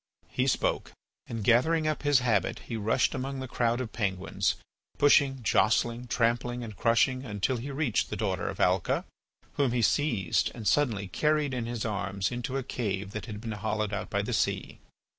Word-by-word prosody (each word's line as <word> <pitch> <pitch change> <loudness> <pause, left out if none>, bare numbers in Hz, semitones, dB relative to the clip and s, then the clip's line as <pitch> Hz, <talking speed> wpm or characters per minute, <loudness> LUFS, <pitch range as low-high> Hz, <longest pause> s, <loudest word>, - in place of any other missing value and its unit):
He - - 0
spoke, - - 0 0.3
and, 115 -3 -4
gathering 155 +9 +3
up 155 -2 -1
his 145 -3 +4
habit, 115 -6 +1
he 115 - -5
rushed 110 +1 +1
among 135 0 -3
the 130 - -5
crowd 120 -1 0
of 125 -4 -5
penguins, 95 -4 -1 0.4
pushing, 140 -3 +4
jostling, 115 +3 +2
trampling, 120 +1 0
and 110 -3 -7
crushing, 130 +4 +2
until 105 +1 -1
he 125 +5 -6
reached 140 -5 0
the - - -3
daughter - - -1
of - - -7
Alca, 90 0 +2 0.5
whom 135 -4 +2
he 120 -2 +1
seized 110 - +2
and 110 -4 -5
suddenly 115 -9 +2
carried 150 - +1
in 120 -2 -2
his 120 -2 -3
arms 100 -2 -2
into 120 +2 -3
a 135 - -2
cave 100 -5 -3
that 105 -2 -6
had 105 -1 -6
been 115 +1 -5
hollowed 105 0 -2
out 100 - -3
by - - 0
the - - -3
sea. - - -1
120 Hz, 180 wpm, -29 LUFS, 105-130 Hz, 0.5 s, his